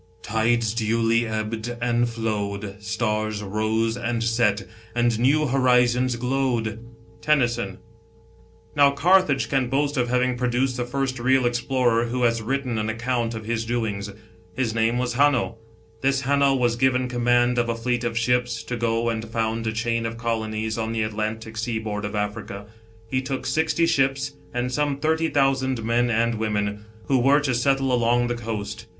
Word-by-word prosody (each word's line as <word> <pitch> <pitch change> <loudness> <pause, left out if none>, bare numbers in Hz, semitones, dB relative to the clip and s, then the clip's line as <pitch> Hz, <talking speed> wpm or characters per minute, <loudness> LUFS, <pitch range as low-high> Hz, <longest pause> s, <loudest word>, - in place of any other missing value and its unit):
" - - -33
Tides 110 +1 +1
duly 115 0 +1
ebbed 110 +2 -3
and 120 0 +1
flowed, 105 -3 -3
Stars 110 -1 -2
rose 110 +3 0
and 120 -1 -2
set, 115 -3 +1 0.3
And 120 -2 +2
new 145 +5 +3
horizons 125 -1 +3
glowed." 120 -3 -1 0.4
TENNYSON. 120 -8 +1 1.0
Now 140 -1 +6
Carthage 170 -2 +3
can 130 -3 0
boast 145 +2 0
of 120 -1 +1
having 125 0 +1
produced 125 +1 0
the 125 - -1
first 130 0 -2
real 130 +1 +3
explorer 120 -1 +1
who 125 +1 -2
has 115 -1 +2
written 125 -1 -2
an 110 0 -1
account 115 0 -1
of 110 -1 -7
his 115 0 -1
doings. 110 -4 -2 0.5
His 125 -4 -1
name 115 +1 +1
was 125 -1 -1
Hamio. 125 -4 +2 0.4
This 135 0 +1
Hanno 140 0 +3
was 120 -2 +1
given 130 0 +2
command 120 0 +2
of 120 0 0
a 115 - 0
fleet 120 +1 -1
of 115 -1 -2
ships, 125 +1 0
to 125 - -4
go 115 0 0
and 110 0 -3
found 115 0 -1
a - - +1
chain 115 +1 -1
of 115 0 -6
colonies 110 -1 -2
on 110 0 -2
the 110 -1 0
Atlantic 110 +1 -4
sea 115 0 -2
board 105 -1 -4
of 105 - -4
Africa. 105 -1 -4 0.4
He 130 +3 -1
took 135 0 -4
sixty 160 +1 +1
ships 140 -3 +1 0.2
and 125 +1 -2
some 145 +1 0
thirty 160 +2 +1
thousand 130 -3 +1
men 120 +2 +1
and 115 0 +1
women, 105 -1 -2 0.2
who 135 -2 +2
were 135 +4 +4
to 135 -3 0
settle 135 +1 +1
along 120 0 +2
the - - 0
coast. 110 -2 -5
120 Hz, 170 wpm, -24 LUFS, 110-130 Hz, 1.0 s, Now